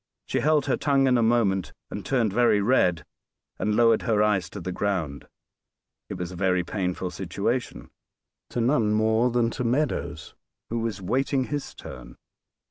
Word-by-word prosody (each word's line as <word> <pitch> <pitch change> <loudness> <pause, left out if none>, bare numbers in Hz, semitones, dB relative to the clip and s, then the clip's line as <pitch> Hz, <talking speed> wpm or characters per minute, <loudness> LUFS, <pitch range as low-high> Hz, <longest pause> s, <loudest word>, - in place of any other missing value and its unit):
She - - -1
held 150 -1 +2
her 135 - +1
tongue 140 -2 +2
in 130 -1 +4
a 120 - +3
moment, 110 -5 +1 0.2
and 105 - -5
turned 115 -1 +1
very 120 -2 +4
red, 90 -7 +2 0.5
and 105 0 0
lowered 115 -1 +4
her 110 -3 +2
eyes 105 -4 +1
to 105 - -8
the 90 0 -4
ground. 90 -8 -2 0.8
It - - -4
was 90 0 -5
a - - -8
very 90 0 +1
painful 90 -1 -3
situation 100 - -3 0.6
to - - -3
none 115 -3 +2
more 110 +3 +2
than 120 -1 +1
to 125 - -3
Meadows, 115 - -1 0.4
who 115 - -1
was 110 -4 -3
waiting 130 +6 +1
his 145 +2 -5
turn. - - -10
110 Hz, 165 wpm, -25 LUFS, 95-125 Hz, 0.8 s, in